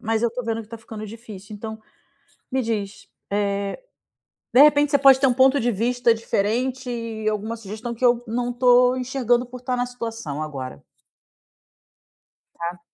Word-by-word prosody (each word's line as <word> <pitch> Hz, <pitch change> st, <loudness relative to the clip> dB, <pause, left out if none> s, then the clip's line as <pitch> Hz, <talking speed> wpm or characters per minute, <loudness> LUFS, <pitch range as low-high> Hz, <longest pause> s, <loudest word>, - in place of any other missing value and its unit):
Mas 225 Hz, 0 st, 0 dB
eu 235 Hz, -, +2 dB
tô 250 Hz, -, -4 dB
vendo 225 Hz, 0 st, -2 dB
que 210 Hz, -, -19 dB
tá 230 Hz, -, -7 dB
ficando 220 Hz, -1 st, -8 dB
difícil. 215 Hz, -2 st, -10 dB
Então 220 Hz, +1 st, -7 dB, 0.7 s
me 260 Hz, 0 st, +1 dB
diz, 210 Hz, -4 st, -4 dB, 1.5 s
eh, 250 Hz, -, +6 dB
de -, -, +11 dB
repente 295 Hz, -1 st, +5 dB
você 285 Hz, -, +5 dB
pode 270 Hz, -1 st, +7 dB
ter 275 Hz, -, +4 dB
um 250 Hz, -, +3 dB
ponto 265 Hz, +2 st, +4 dB
de 240 Hz, 0 st, +1 dB
vista 235 Hz, +3 st, +2 dB
diferente 240 Hz, +4 st, -1 dB
e 230 Hz, -2 st, -4 dB
alguma 215 Hz, +2 st, -3 dB
sugestão 220 Hz, +3 st, -6 dB
que 240 Hz, +2 st, -1 dB
eu 240 Hz, 0 st, +3 dB
não 245 Hz, +2 st, -2 dB
tô 250 Hz, 0 st, +5 dB
enxergando 250 Hz, -1 st, 0 dB
por 250 Hz, 0 st, -10 dB
tá 250 Hz, 0 st, -1 dB
na 245 Hz, -, 0 dB
situação 230 Hz, -, -5 dB
agora. 130 Hz, -, -6 dB, 1.7 s
Tá. 170 Hz, +1 st, -5 dB
235 Hz, 165 wpm, -23 LUFS, 220-250 Hz, 1.7 s, de